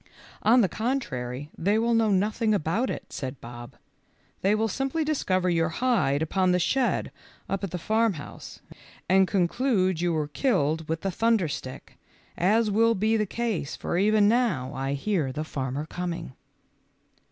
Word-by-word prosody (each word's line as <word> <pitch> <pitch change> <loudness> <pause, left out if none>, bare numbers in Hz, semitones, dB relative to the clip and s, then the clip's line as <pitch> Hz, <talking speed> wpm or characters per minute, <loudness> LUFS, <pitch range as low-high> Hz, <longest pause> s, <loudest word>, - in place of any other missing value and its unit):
" - - -22
On 245 +1 +7
the 200 - +3
contrary 150 - -3
they 200 +5 +1
will 230 +1 +2
know 225 -1 +3
nothing 215 +3 +1
about 200 +9 0
it," - - -6
said 130 0 -5
Bob; 120 0 -10 0.7
"they 200 +2 +3
will 220 +1 +1
simply 270 - -1
discover 185 -12 0
your 165 -2 +2
hide 165 - +1
upon 185 +3 +1
the 180 - +3
shed 245 +8 0 0.4
up 195 0 -3
at 195 - -2
the 180 - -4
farmhouse, 215 -4 -2 0.5
and 190 +1 +4
conclude 185 -2 +1
you 175 0 +1
were 155 -2 -1
killed 160 - 0
with 160 0 -2
the 195 - -1
thunder 225 -2 +2
stick, 130 -3 -7 0.4
as 210 +4 +2
will 230 +2 +3
be 215 +3 +1
the 215 -1 +1
case, 220 -10 -2
for - - -3
even 205 +2 +4
now 205 - +1
I 135 0 -2
hear 150 -2 -1
the 150 +4 -3
farmer 140 -1 -4
coming." 170 -3 -5
185 Hz, 165 wpm, -26 LUFS, 155-225 Hz, 0.7 s, On